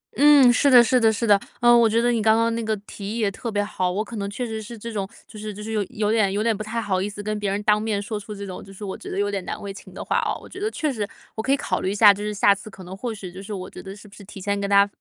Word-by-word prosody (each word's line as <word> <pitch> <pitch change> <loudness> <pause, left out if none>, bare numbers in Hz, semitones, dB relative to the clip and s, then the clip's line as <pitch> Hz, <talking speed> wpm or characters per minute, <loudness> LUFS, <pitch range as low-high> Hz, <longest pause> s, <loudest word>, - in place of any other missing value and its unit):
嗯， 285 -3 +7
是 280 +3 +3
的 250 -3 +8
是 250 +2 +3
的 225 -2 +4
是 220 +2 -2
的。 205 -3 +5 0.2
呃， 240 0 +6
我 235 -1 +5
觉 225 +2 +2
得 240 +1 +2
你 230 -2 +1
刚 220 +1 +4
刚 230 0 +2
那 230 0 -2
个 220 0 0
提 205 +1 -6
议 - - -3
也 215 -4 +1
特 230 +3 -5
别 205 -1 0
好， 185 -3 -1
我 200 +4 -1
可 230 - -8
能 200 -1 -3
确 230 +5 -4
实 220 -2 -5
是 230 +2 -9
这 230 +2 -7
种 200 -2 -2 0.2
就 215 - -11
是 215 0 -5
就 210 +1 -8
是 220 - -5
有 215 -2 0
有 210 0 -1
点 215 -3 +2
有 205 +2 -1
点 230 -1 +2
不 215 - -5
太 225 +2 -3
好 195 -4 -1
意 200 - -2
思 205 0 -8
跟 215 0 -2
别 205 -1 -1
人 200 +1 -1
当 210 -1 +3
面 215 -2 -1
说 210 +1 -4
出 210 +1 -8
这 200 0 -6
种， 185 -2 -7
就 195 - -13
是 195 +2 -10
我 190 - -4
觉 - - -9
得 - - -4
有 205 0 0
点 195 -2 -3
难 - - -5
为 200 -1 -6
情 195 - -12
的 - - -6
话 - - +1
哦。 - - -1
我 - - -13
觉 380 - -10
得 420 +2 -1
确 310 -9 -2
实 210 -4 -3 0.3
我 220 - -3
可 265 - -1
以 275 - +4
考 185 -9 -2
虑 185 - -1
一 200 - -2
下， 205 -1 +8
就 205 +1 -7
是 210 - -2
下 205 -1 +4
次 200 +2 -9
可 195 -2 -12
能 180 +1 -8
或 235 +5 -4
许 195 -4 -8
就 185 +2 -9
是 200 +2 -9
我 185 -2 -5
觉 - - -10
得 195 0 -9
是 210 +1 -14
不 200 - -18
是 205 - -12
提 195 - -10
前 200 +1 -1
跟 200 - -2
他 200 0 +6
210 Hz, 390 characters per minute, -23 LUFS, 200-230 Hz, 0.3 s, 的